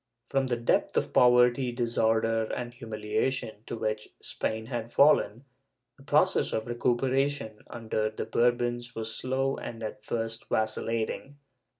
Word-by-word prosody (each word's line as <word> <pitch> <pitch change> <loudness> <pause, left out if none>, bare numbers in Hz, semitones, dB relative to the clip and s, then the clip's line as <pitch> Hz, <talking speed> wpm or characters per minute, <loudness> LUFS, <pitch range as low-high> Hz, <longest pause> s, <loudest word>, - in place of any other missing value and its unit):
^ - - -26
From 135 -1 +2
the 125 - +1
depth 120 - +1
of - - 0
poverty, 125 +1 +5
disorder 115 -2 +1
and 120 +2 -5
humiliation 110 +1 -2
to - - -4
which 110 -1 -2
Spain 110 0 -3
had 115 -1 -4
fallen, 140 -4 +4 0.5
the - - -19
process - - +2
of 110 - -1
recuperation 125 -1 0
under 110 -2 -2
the 110 - -5
Bourbons 120 0 0
was 110 -1 -3
slow 135 +1 -1
and 115 -1 -7
at 105 -1 -6
first 115 0 -3
vacillating. 115 +5 -1
120 Hz, 135 wpm, -28 LUFS, 110-125 Hz, 0.5 s, poverty